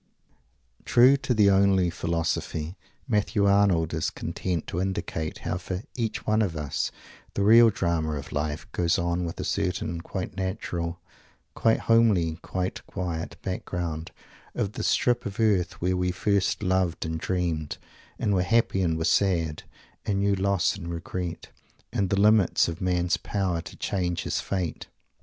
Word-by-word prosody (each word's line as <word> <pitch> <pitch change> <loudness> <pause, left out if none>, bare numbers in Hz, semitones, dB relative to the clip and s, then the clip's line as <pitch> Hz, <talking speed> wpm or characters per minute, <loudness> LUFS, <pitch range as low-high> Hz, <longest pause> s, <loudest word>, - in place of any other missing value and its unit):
True 125 +3 +6
to 130 -1 -4
the 105 -2 +5
"only 95 -2 +4
philosophy," 85 -1 -2 0.3
Matthew 105 -1 +1
Arnold 100 -5 +3
is 80 0 0
content 85 0 -3
to 90 - -3
indicate 95 -4 -3
how 90 - -1
for 95 +2 -5
each 115 -3 -3
one 110 +1 +2
of 90 -7 -1
us 75 -2 -2 0.5
the 100 - +1
real 115 +3 +8
drama 85 -6 0
of 70 -1 -6
life 75 +2 -2
goes 85 -2 +1
on 85 +1 0
with 85 - -6
a - - -2
certain 85 0 -1
quite 90 +1 -5
natural, 90 -3 -3 0.5
quite 115 -1 +2
homely, 100 -9 +3
quite 95 0 -3
quiet 85 -3 -4
background 85 -4 -3 0.5
of 100 - -1
the 120 - -5
strip 120 0 +2
of 100 +2 -8
earth 100 -5 +2
where 90 +2 +1
we 90 0 0
first 100 +2 0
loved 95 -3 +1
and 80 0 -3
dreamed, 85 -4 -2 0.4
and 105 - 0
were 95 - +3
happy, 110 0 +2
and 80 -3 +1
were 80 - -1
sad, 85 -6 +2 0.4
and 100 -1 0
knew 100 0 +3
loss 100 0 +1
and 95 -4 -7
regret, 85 +1 -5 0.4
and 100 -2 0
the 100 - +1
limits 105 -2 +4
of 85 -1 -5
man's 90 -1 +1
power 95 -4 -1
to 85 - -11
change 90 -3 -1
his - - -1
fate. 90 -5 -3
90 Hz, 155 wpm, -26 LUFS, 85-100 Hz, 0.5 s, real